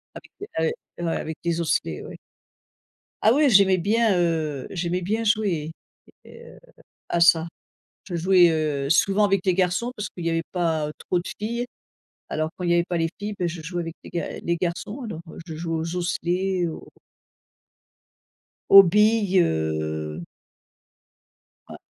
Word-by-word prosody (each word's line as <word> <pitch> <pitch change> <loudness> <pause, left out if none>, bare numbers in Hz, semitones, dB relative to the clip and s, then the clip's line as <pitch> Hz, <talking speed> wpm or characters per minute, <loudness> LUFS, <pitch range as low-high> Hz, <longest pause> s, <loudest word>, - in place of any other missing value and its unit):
Avec - - -12
des 410 - -7
ah 160 0 +1
et 175 - -6
ouais, 165 - 0
avec 160 0 -5
des 170 0 -1
osselets, 80 - -1
ouais. - - -9 1.1
Ah 220 - +6
oui, 290 +3 +4
j'aimais 195 -3 +5
bien, 215 +1 +2
heu, 160 -5 -1
j'aimais 175 0 -2
bien 215 +5 -1
jouer 200 -8 0 0.5
et - - -13
heu, - - -14 0.5
à 170 - 0
ça. 170 -1 +5 0.6
Je 180 - -5
jouais, 180 +1 +5
heu, 150 -3 -1
souvent 195 +6 +3
avec 195 -2 0
les 185 - +3
garçons 185 +6 0
parce 210 -3 -5
qu'il 175 - -9
y 165 - +1
avait 165 0 0
pas 160 -4 0
trop 180 - -1
de 175 - -8
filles, 235 +3 -3 0.6
alors 155 0 -2
quand - - -7
il 175 - 0
y - - +4
avait 170 0 +3
pas 175 - -1
les 165 0 +1
filles, 205 +1 -4
bah, 175 -2 -1
je 170 -1 -7
jouais 175 +3 -4
avec 165 0 -7
les - - -10
ga 170 - -4
les 170 0 -1
garçons 185 +9 -3
alors, 215 -9 -6
heu, - - -11
je 165 -3 -8
jouais 165 +1 -3
aux 165 +2 -4
osselets, 180 +1 -1
aux 160 - -8 1.8
aux 195 - +11
billes, 210 0 +3
heu 80 - -2 1.5
Ouais. - - -9
175 Hz, 175 wpm, -24 LUFS, 165-195 Hz, 1.8 s, aux